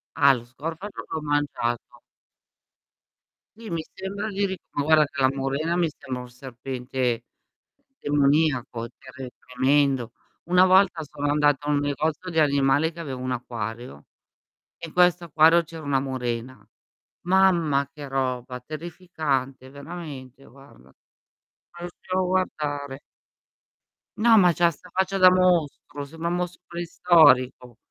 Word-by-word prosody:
Ah, 140 -1 +6
lo 120 -3 -5
scorfano 165 +10 -7
l'ho 160 - -4
mangiato. 145 -5 -2 1.6
Sì, 225 -1 -10
mi 165 -2 -2
sembra 195 +3 -5
di 200 0 -1
ric 190 -1 -4
ma 145 - -2
guarda 155 +1 +5
che 145 0 -6
la 130 - +5
murena 140 +5 -2
mi 175 -2 +1
sembra 130 -3 -7
un 125 - -11
serpente 125 -1 -4 0.8
demoniaco, 140 -5 +1
tre 130 -1 -10
tremendo. 130 -1 +1 0.3
Una 180 +1 +5
volta 185 -3 +4
sono 145 0 -3
andata 145 -1 +2
a - - 0
un 145 - +2
negozio 150 +5 -2
di 165 -3 +1
animali 140 +1 +2
che 170 - -17
aveva 140 -6 -5
un 130 0 -3
acquario, 120 - -6 0.7
in 165 -2 -8
questo 180 -1 +3
acquario 160 +2 +5
c'era 165 0 -10
una 140 -2 +1
murena. 125 -3 -4 0.6
Mamma 170 -7 +3
che 145 -2 -9
roba, 130 -1 -2
terrificante, 150 -4 -4
veramente 140 -3 -9
guarda, 135 - -18
non 65 - -24 0.9
riuscivo 185 +1 -4
a 185 - 0
guardare. 145 -7 -2 1.2
No, 225 +1 +5
ma 180 -4 +6
c'ha 170 +2 +3
'sta 175 +3 -13
faccia 190 +1 0
da 185 -1 +7
mostro, 170 -6 +1
sembra 160 +4 -6
un 175 - 0
mostro 180 0 -4
preistorico. 160 -8 +3
145 Hz, 135 wpm, -24 LUFS, 130-170 Hz, 1.6 s, da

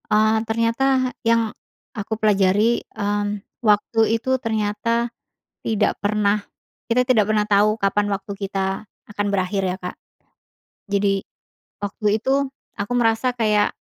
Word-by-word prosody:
Eee, 215 +1 +4
ternyata 250 +3 +1
yang 230 -2 +2 0.4
aku 215 +1 -4
pelajari, 210 +2 +3
mmm, 205 0 -1 0.2
waktu 215 0 +2 0.2
itu 260 +3 0
ternyata 225 +2 0 0.5
tidak 220 -2 +1
pernah 205 0 +1 0.5
kita 245 +1 +2
tidak 245 -5 +3
pernah 215 -1 +2
tahu 210 +1 +4
kapan 205 +1 +2
waktu 195 +1 -5
kita 195 0 -2 0.2
akan 205 0 -2
berakhir, 195 0 0
ya, 180 - 0
Kak. 180 - -6 0.9
Jadi, 200 -1 +1 0.6
waktu 205 +1 0
itu, 270 +4 +1 0.2
aku 205 +2 -5
merasa 225 +1 +2
kayak, 210 -2 +3
210 Hz, 120 wpm, -22 LUFS, 205-230 Hz, 0.9 s, Eee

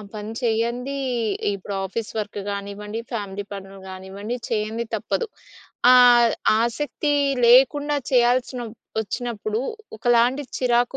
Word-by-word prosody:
పని 215 +1 -6
చేయంది, 240 +4 -1 0.6
ఇప్పుడు 200 +1 -6
office 210 +3 -4
work 210 -1 -4
కానివ్వండి, 200 +2 -5
ఫ్యామిలీ 205 -2 -4
పనులు 195 0 -8
కానివ్వండి 195 +5 -6
చేయంది 220 +1 -1
తప్పదు. 470 - -2 0.6
ఆహ్, 240 -2 +7 0.3
ఆసక్తి 290 +5 -1 0.3
లేకుండా 290 +4 +5 0.2
చేయాల్సినప్ 245 -1 +1 0.2
వచ్చినప్పుడు 220 0 -3 0.4
ఒకలాంటి 240 +4 +3
చిరాకు 245 +1 +2
230 Hz, 100 wpm, -23 LUFS, 210-245 Hz, 0.6 s, ఆహ్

